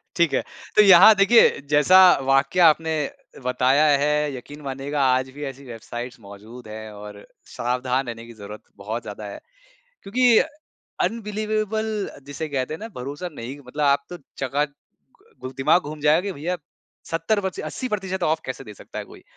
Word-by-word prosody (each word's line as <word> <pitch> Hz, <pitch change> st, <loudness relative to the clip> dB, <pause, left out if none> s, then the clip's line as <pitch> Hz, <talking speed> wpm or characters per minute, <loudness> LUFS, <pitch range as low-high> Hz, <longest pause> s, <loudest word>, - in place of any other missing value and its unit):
ठीक 170 Hz, -5 st, +2 dB
है, -, -, +1 dB, 0.3 s
तो 210 Hz, -, +8 dB
यहाँ 195 Hz, +2 st, +9 dB
देखिए 200 Hz, -1 st, +5 dB
जैसा 150 Hz, +6 st, +6 dB, 0.3 s
वाकया 135 Hz, +6 st, +4 dB
आपने 160 Hz, +1 st, 0 dB, 0.5 s
बताया 130 Hz, +4 st, +3 dB, 0.2 s
है 150 Hz, 0 st, +2 dB, 0.2 s
यकीन 145 Hz, +4 st, -10 dB
मानिएगा 140 Hz, +1 st, -3 dB
आज 130 Hz, 0 st, -2 dB
भी 145 Hz, -, -6 dB
ऐसी 135 Hz, +1 st, -16 dB
वेबसाइट्स 120 Hz, +1 st, -8 dB
मौजूद 110 Hz, +3 st, -12 dB
हैं 110 Hz, 0 st, -8 dB
और 105 Hz, 0 st, -11 dB, 0.3 s
सावधान 125 Hz, +2 st, -1 dB
रहने 115 Hz, -1 st, -7 dB
की 115 Hz, -, -12 dB
ज़रूरत 105 Hz, +1 st, -9 dB, 0.2 s
बहुत 110 Hz, +3 st, -3 dB
ज़्यादा 105 Hz, 0 st, -8 dB
है। -, -, -9 dB, 0.6 s
क्योंकि 250 Hz, +5 st, +2 dB, 0.8 s
अनबिलीवेबल 215 Hz, 0 st, -2 dB, 0.4 s
जिसे 150 Hz, +2 st, -5 dB
कहते 135 Hz, +1 st, -2 dB
हैं -, -, -7 dB
ना, 225 Hz, -, -6 dB
भरोसा 145 Hz, +8 st, -5 dB
नहीं 130 Hz, +4 st, -7 dB
मतलब 145 Hz, +4 st, -4 dB
आप 140 Hz, 0 st, +3 dB
तो 175 Hz, -, -6 dB, 0.3 s
चका 140 Hz, +3 st, +1 dB
घु 130 Hz, -2 st, -14 dB
दिमाग 165 Hz, +5 st, +4 dB
घूम 155 Hz, -, -10 dB
जाएगा 150 Hz, +3 st, +4 dB
कि 200 Hz, -, -2 dB
भैया 175 Hz, +3 st, -3 dB, 0.5 s
70 165 Hz, +6 st, 0 dB
पस्सी 190 Hz, -, -3 dB
80% 195 Hz, -7 st, -4 dB
ऑफ 160 Hz, -1 st, +1 dB
कैसे 130 Hz, +1 st, -6 dB
दे 105 Hz, -2 st, -11 dB
सकता -, -, -10 dB
है -, -, -5 dB
कोई? -, -, -15 dB
145 Hz, 165 wpm, -23 LUFS, 125-180 Hz, 0.8 s, यहाँ